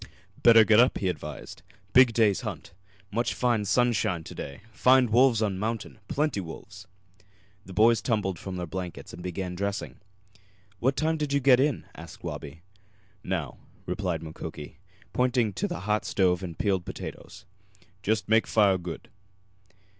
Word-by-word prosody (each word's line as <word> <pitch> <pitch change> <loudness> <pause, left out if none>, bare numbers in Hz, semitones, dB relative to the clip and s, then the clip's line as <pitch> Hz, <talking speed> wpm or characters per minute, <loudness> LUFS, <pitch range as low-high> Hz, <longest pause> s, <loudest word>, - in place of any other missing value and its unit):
"Better 115 -2 +8
get 110 0 +5
up," 125 +2 +4
he 95 - -1
advised. 75 -4 -7 0.3
"Big 130 -1 +7
day's 110 -4 +2
hunt. - - -7 0.4
Much 115 -1 -1
fine 120 -3 +1
sunshine 105 -6 +1
to - - -9
day. 70 - -8
Find 125 +3 +4
wolves 120 -1 +4
on 95 -3 -1
mountain 110 +1 -4
plenty 150 -7 0
wolves!" 95 +3 -9 0.8
The 95 - -9
boys 110 +3 +4
tumbled 100 -8 -1
from 95 -1 -6
their 90 -1 -3
blankets 90 +2 -7
and 85 - -9
began 90 0 -4
dressing. 100 +2 -4 0.8
"What 130 +3 +1
time 160 +1 +1
did 150 -2 -2
you 140 - +3
get 130 -2 +5
in?" 140 -1 +1
asked 85 -1 -12
Wabi. 80 +4 -7 0.6
"Now," 85 -8 -3 0.3
replied 90 -3 -2
Mukoki, 80 0 -8 0.3
pointing 125 -4 +1
to 95 - -2
the - - -5
hot 105 +2 0
stove 90 -2 +1
and 85 -3 -6
the - - -35
peeled 95 -1 0
potatoes. - - -9 0.6
"Just 105 0 0
make 110 +1 +3
fire 100 -4 +3
good." 85 -1 -7
105 Hz, 155 wpm, -27 LUFS, 90-120 Hz, 0.8 s, Better